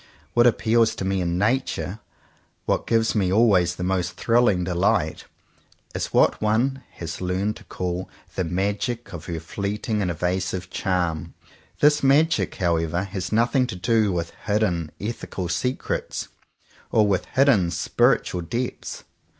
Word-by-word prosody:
What 120 0 +5
appeals 115 -1 +3
to 95 - -4
me 95 0 0
in 85 0 -1
Nature, 110 -2 0 0.7
what - - 0
gives 115 -1 +2
me 95 -4 +1
always 95 -5 +4
the 90 - -5
most 90 -1 0
thrilling 115 -6 +2
delight, 90 -1 0 0.7
is - - -2
what - - +3
one 120 +6 +1
has 85 0 -6
learned 95 +4 -1
to - - -14
call 90 0 -4 0.2
the 95 - -1
magic 100 +7 -2
of 85 -2 -7
her 85 -2 -3
fleeting 105 +5 -3
and 95 - 0
evasive 90 +1 -2
charm. 90 -6 -1 0.5
This 150 0 +5
magic," 150 +4 +3
however, 85 -1 0
has 95 -1 -5
nothing 120 +3 +2
to 115 - -5
do 110 +2 +2
with 85 -2 -2 0.2
hidden 95 -7 +1
ethical 100 -4 -4
secrets, 125 +10 -2 0.6
or 110 - +4
with 100 -3 +1
hidden 130 -10 +4
spiritual 85 +1 +1
depths. 120 +9 -4
95 Hz, 140 wpm, -24 LUFS, 90-115 Hz, 0.7 s, What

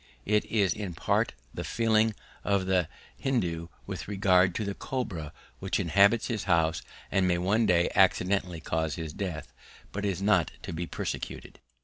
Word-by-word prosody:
It 105 +1 +2
is 100 -4 +2
in 100 -5 -5
part - - +1 0.2
the - - -4
feeling 110 -1 +2 0.3
of 100 -2 +1
the 95 -3 +2 0.3
Hindoo 85 -11 -1 0.2
with - - -6
regard 95 -3 +3
to 110 - -1
the 100 - -2
cobra 95 - -4 0.3
which 95 -1 -1
inhabits 100 +6 +4
his 110 -4 -2
house 80 -3 +2 0.3
and 95 -1 +3
may 90 -1 +2
one 100 +6 +2
day 85 -1 +4
accidently 90 -2 +2
cause 80 -1 -1
his 80 -2 -5
death, 90 -5 -5 0.4
but 105 - -4
is 95 -3 -1
not 95 -4 +2
to - - -5
be 85 +1 -3
persecuted. - - -5
95 Hz, 160 wpm, -29 LUFS, 85-105 Hz, 0.4 s, inhabits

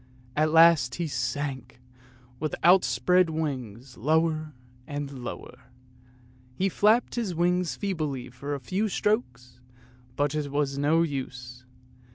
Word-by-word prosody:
At 155 +1 +2
last 160 -6 +5
he 170 - -2
sank, 130 -1 -4 0.6
with 155 0 -2
outspread 175 +1 +4
wings, 130 -6 -5
lower 155 +2 0 0.3
and 140 -3 -6
lower; 125 +1 -8 0.9
he 195 +6 +1
flapped 215 +6 +3
his 220 -8 -2
wings 175 -3 +1
feebly 145 -8 -3
for 140 +4 -5
a - - -5
few 190 - -1
strokes, 125 - -2 0.6
but 145 0 0
it 150 -2 -2
was 140 -1 -1
no 155 +4 +3
use. 130 -4 -6
145 Hz, 120 wpm, -27 LUFS, 130-170 Hz, 0.9 s, last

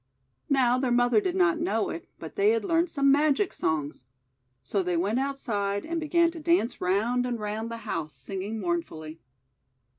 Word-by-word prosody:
Now 255 -2 +3
their 260 -1 0
mother 245 - +4
did 370 -2 -2
not 365 -3 +3
know 340 +3 0
it, - - -8
but - - -9
they 405 0 +4
had 450 -1 +1
learned 335 -1 +2
some 275 -3 +3
magic 295 +6 +2
songs. 150 -5 -2 0.6
So 200 - -1
they 180 -2 -1
went 205 +8 +1
outside, 210 -8 -1
and 330 +1 -2
began 335 +2 +2
to 330 - -9
dance 325 -6 +1
round 220 +7 +1
and 245 -2 -2
round 215 +2 -3
the 230 - -5
house, 155 -4 -4
singing 195 +10 -5
mournfully. 165 - -4
250 Hz, 175 wpm, -27 LUFS, 200-335 Hz, 0.6 s, mother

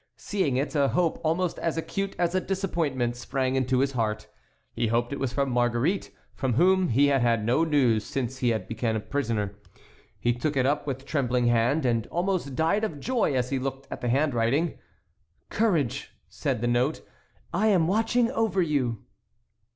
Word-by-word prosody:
Seeing 170 -11 -1
it, 140 +5 -1
a 140 -3 +3
hope 170 +2 0
almost 165 +2 0
as 165 -1 -1
acute 195 +4 -3
as 175 0 +1
a 185 - +1
disappointment 160 -12 -1
sprang 130 +1 -2
into 130 -1 +1
his 135 0 +1
heart; 110 -4 -2 0.5
he 115 - 0
hoped 120 +3 0
it - - -4
was 135 -3 -1
from 140 0 0
Marguerite, 120 +9 +1 0.2
from 130 -3 -1
whom 185 +7 +3
he 135 +5 +4
had 135 -2 +2
had 115 -3 +2
no 125 +8 +3
news 130 -9 +2
since 130 +1 -4
he 125 - +2
had 110 -2 -1
been 115 0 -1
a - - 0
prisoner. 110 -5 -2 0.7
He 120 - +1
took 140 +4 -2
it 130 - +3
up 145 +2 0
with 135 -1 -4
trembling 125 -4 0
hand, 120 +6 +2
and 115 -3 +1
almost 175 -6 -1
died 165 +9 +1
of 165 -10 -3
joy 235 - 0
as 125 0 0
he 135 - 0
looked 135 +1 -5
at - - -6
the 120 - -1
handwriting. 135 +3 +1 0.7
"Courage!" 175 - 0
said - - -2
the 120 - 0
note. 125 +5 0 0.5
"I 210 +5 +2
am 185 -6 +4
watching 225 +4 +2
over 225 -7 0
you." 130 -8 -1
135 Hz, 180 wpm, -26 LUFS, 120-165 Hz, 0.7 s, he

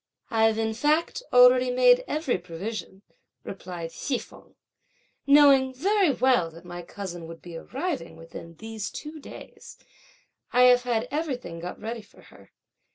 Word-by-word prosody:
"I've 225 -1 +3
in 220 0 -1
fact 300 - 0
already 250 0 +6
made 250 0 +5
every 300 - -1
provision," 190 +3 -7 0.4
rejoined 175 -3 -7
Hsi 265 - -2
feng; - - -14 0.7
"knowing 275 -2 +6
very 390 +5 +2
well 255 -10 +2
that 165 +2 -15
my 175 0 -7
cousin 175 -2 -8
would 165 0 -10
be 175 -1 -9
arriving 270 - -4
within 165 0 -11
these 220 +2 -6
two 310 +1 -8
days, - - -12 0.7
I 250 - +5
have 250 0 +6
had 240 -1 -1
everything 260 - -4
got 175 +2 -7
ready 230 +1 -5
for - - -20
her. - - -18
230 Hz, 145 wpm, -26 LUFS, 175-265 Hz, 0.7 s, already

